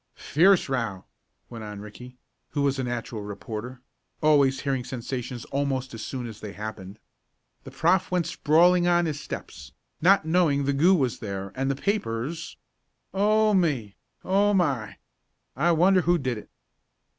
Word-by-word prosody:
"Fierce 185 +5 +3
row," 115 -8 -3 0.4
went 115 -2 -8
on 105 -1 -7
Ricky, 125 +5 -11 0.3
who 145 - -1
was 140 -1 +1
a - - 0
natural 120 -2 -4
reporter, 110 +4 -7 0.4
always 140 -3 +3
hearing 135 -3 -1
sensations 125 0 -5
almost 135 -2 -1
as 110 -1 -6
soon 130 -2 -5
as 110 -3 -9
they 105 -2 -7
happened. 105 -2 -7 0.7
"The - - -7
prof. 190 0 +2
went 180 -2 0
sprawling 175 +3 +3
on 175 0 +3
his 150 -3 -3
steps, 65 - -8 0.3
not 185 0 +5
knowing 160 -4 +2
the 140 +1 +1
goo 170 +8 +5
was 130 -8 0
there 100 -2 -5
and 135 +1 -1
the 135 - 0
papers 155 - -3 0.6
Oh 215 +2 +3
me! 140 - 0 0.3
Oh 200 +2 +2
my! 135 - 0 0.6
I 165 +7 +2
wonder 180 +3 +4
who 175 +1 +2
did 130 -7 -2
it?" - - -15
135 Hz, 155 wpm, -26 LUFS, 115-175 Hz, 0.7 s, not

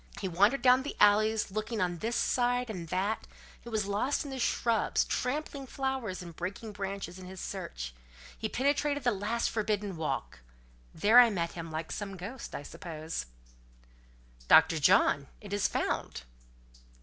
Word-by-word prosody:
He 195 - -2
wandered 205 +9 +3
down 255 0 +6
the 285 - -5
alleys, 210 0 +4
looking 215 +2 -3
on 175 -2 -1
this 230 +5 -2
side 245 -1 +1
and 190 - -5
on 170 - -6
that—he 200 +6 -4
was 215 -3 0
lost 205 +8 0
in 285 - -7
the 265 - -5
shrubs, 230 -2 +1
trampling 275 +1 -2
flowers 265 -9 -3
and 170 -2 -10
breaking 195 +6 -5
branches 195 -3 -5
in 185 - -9
his 190 0 -9
search—he - - -7
penetrated 285 +2 0
at 240 -3 +3
last 220 +4 -1
the - - -8
"forbidden 210 -3 -1
walk." 140 - -3 0.5
There 215 +8 +6
I 245 -1 +8
met 170 -5 -1
him, 165 -1 -7
like 160 +1 -5
some 195 -2 -5
ghost, 220 +8 -7
I - - -5
suppose. 160 - -6 1.2
"Dr. 160 - +6
John! 140 -1 +4
it 205 -1 -8
is 205 -1 +2
found." - - -2
205 Hz, 160 wpm, -30 LUFS, 175-240 Hz, 1.2 s, I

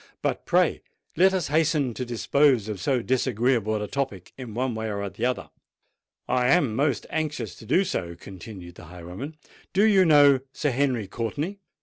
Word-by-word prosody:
"But - - -2
pray - - +2 0.3
let 190 +2 +5
us 185 -6 -1
hasten 150 -4 +1
to 125 - -4
dispose 125 0 +2
of 105 -4 -5
so 130 -5 0
disagreeable 120 -3 +1
a - - -4
topic 125 -10 -4
in 120 -5 -8
one 125 0 -1
way 110 0 -3
or 100 0 -3
the 110 +6 -1
other." 125 - -3 0.8
"I 125 0 +2
am 135 -7 +3
most 140 0 0
anxious 150 -9 -3
to 110 - -13
do 185 - +3
so," 90 - -3
continued 90 0 -10
the - - -13
highwayman. 90 - -8 0.4
"Do 195 +3 +3
you 205 -3 +5
know 145 -5 +6
Sir 145 - -1
Henry 130 -4 0
Courtenay?" 145 - -4
125 Hz, 175 wpm, -25 LUFS, 110-145 Hz, 0.8 s, know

